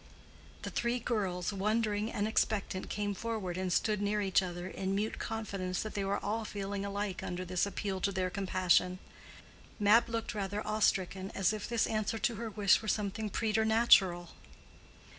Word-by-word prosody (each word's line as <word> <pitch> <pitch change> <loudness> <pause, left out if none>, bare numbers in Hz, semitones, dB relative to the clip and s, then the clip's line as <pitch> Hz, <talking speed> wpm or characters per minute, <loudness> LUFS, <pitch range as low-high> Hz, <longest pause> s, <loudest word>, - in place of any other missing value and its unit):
The - - -4
three 235 +1 0
girls, 200 -6 -1
wondering 215 +2 0
and 205 0 -1
expectant, 205 -3 0
came 205 0 -1
forward 210 -4 -3
and 185 0 -2
stood 210 +3 +1
near 205 +1 +1
each 195 -2 +3
other 175 -1 -5
in 190 0 -2
mute 210 +2 -2
confidence 195 -5 -3
that 215 - -6
they 200 - -1
were 195 +1 0
all 220 +2 -1
feeling 200 -1 -4
alike 200 -1 -3
under 180 +1 -4
this 180 +2 0
appeal 195 -1 -3
to 200 - +1
their 185 -1 -1
compassion. 185 -2 +2 0.8
Mab 210 +3 +5
looked 230 0 -3
rather 205 0 -3
awe 215 0 -1
stricken, 190 -1 +1
as 195 +1 +2
if 215 0 -5
this 235 -1 +2
answer 215 0 -1
to 240 0 0
her 230 0 -4
wish 205 -1 +3
were 220 - -7
something 210 0 -1
preternatural. 220 -5 +3
205 Hz, 170 wpm, -32 LUFS, 190-220 Hz, 0.8 s, Mab